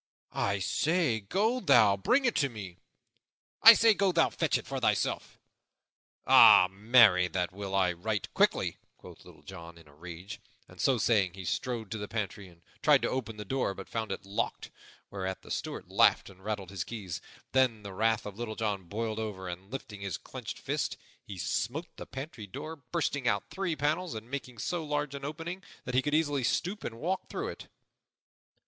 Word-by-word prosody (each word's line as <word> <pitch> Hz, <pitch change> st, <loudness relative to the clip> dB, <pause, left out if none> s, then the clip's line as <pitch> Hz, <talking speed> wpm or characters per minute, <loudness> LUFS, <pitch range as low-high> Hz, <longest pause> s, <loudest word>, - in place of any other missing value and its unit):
"I 100 Hz, +1 st, 0 dB
say, 155 Hz, -, +1 dB
go 210 Hz, -, 0 dB
thou, 120 Hz, -, +5 dB
bring 250 Hz, -, +2 dB
it 145 Hz, -, +1 dB
me!" 95 Hz, -5 st, -9 dB, 0.8 s
"I 230 Hz, -, +12 dB
say, 225 Hz, 0 st, +5 dB
go 200 Hz, -2 st, +2 dB
thou, 165 Hz, -2 st, +3 dB
fetch -, -, +1 dB
it -, -, -8 dB
for -, -, -4 dB
thyself!" -, -, 0 dB, 0.9 s
"Ay, 90 Hz, -, +8 dB
marry, 105 Hz, -3 st, +5 dB
that 90 Hz, -1 st, -2 dB
will 95 Hz, 0 st, -5 dB
I, 90 Hz, -2 st, +3 dB
right 100 Hz, +4 st, -3 dB
quickly!" -, -, +2 dB, 0.2 s
quoth -, -, -14 dB
Little -, -, -16 dB
John 85 Hz, -3 st, -10 dB
in 85 Hz, -2 st, -17 dB
a 70 Hz, -, -18 dB
rage. 85 Hz, +5 st, -9 dB, 0.3 s
And, -, -, -10 dB
so 135 Hz, -3 st, +3 dB
saying, 100 Hz, -5 st, +2 dB
he 95 Hz, -1 st, -8 dB
strode 115 Hz, +2 st, -3 dB
to 110 Hz, -, -3 dB
the 105 Hz, -, -5 dB
pantry 105 Hz, -3 st, -4 dB
and 85 Hz, -2 st, -20 dB, 0.2 s
tried -, -, +5 dB
to -, -, 0 dB
open 115 Hz, -4 st, -3 dB
the 105 Hz, -, -6 dB
door 125 Hz, -3 st, -1 dB
but 95 Hz, -, -9 dB
found 110 Hz, -3 st, -3 dB
it 95 Hz, -, -5 dB
locked, 100 Hz, +1 st, -3 dB, 0.4 s
whereat 95 Hz, -1 st, -4 dB
the -, -, -11 dB
Steward -, -, -4 dB
laughed -, -, +4 dB
and 95 Hz, 0 st, -19 dB
rattled 100 Hz, -3 st, -4 dB
his 95 Hz, -3 st, -3 dB
keys. 100 Hz, -7 st, -6 dB, 0.3 s
Then 125 Hz, -5 st, +2 dB
the 100 Hz, -1 st, -7 dB
wrath 110 Hz, +2 st, +1 dB
of 105 Hz, +1 st, -8 dB
Little 115 Hz, -2 st, -4 dB
John 105 Hz, -4 st, -2 dB
boiled 110 Hz, +4 st, -3 dB
over, 100 Hz, -4 st, -5 dB
and, 90 Hz, +2 st, -7 dB
lifting 125 Hz, -6 st, -7 dB
his 100 Hz, -4 st, -3 dB
clenched -, -, -8 dB
fist, -, -, -2 dB, 0.3 s
he 100 Hz, -, -9 dB
smote 120 Hz, -, -3 dB
the -, -, -8 dB
pantry 130 Hz, -5 st, -7 dB
door, 155 Hz, +11 st, -7 dB, 0.2 s
bursting 145 Hz, -6 st, -1 dB
out 100 Hz, -3 st, 0 dB
three 190 Hz, -4 st, -2 dB
panels 155 Hz, +3 st, -1 dB
and 110 Hz, +3 st, -8 dB
making 130 Hz, -3 st, -5 dB
so 170 Hz, +9 st, -2 dB
large 150 Hz, -1 st, -2 dB
an 140 Hz, -1 st, -7 dB
opening 165 Hz, +5 st, -5 dB, 0.2 s
that 125 Hz, -, -4 dB
he 130 Hz, -, +4 dB
could 145 Hz, +2 st, 0 dB
easily 145 Hz, -4 st, +1 dB
stoop 190 Hz, -, -1 dB
and 115 Hz, -, -5 dB
walk 185 Hz, +6 st, -2 dB
through -, -, -3 dB
it. -, -, -9 dB
110 Hz, 190 wpm, -30 LUFS, 95-140 Hz, 0.9 s, I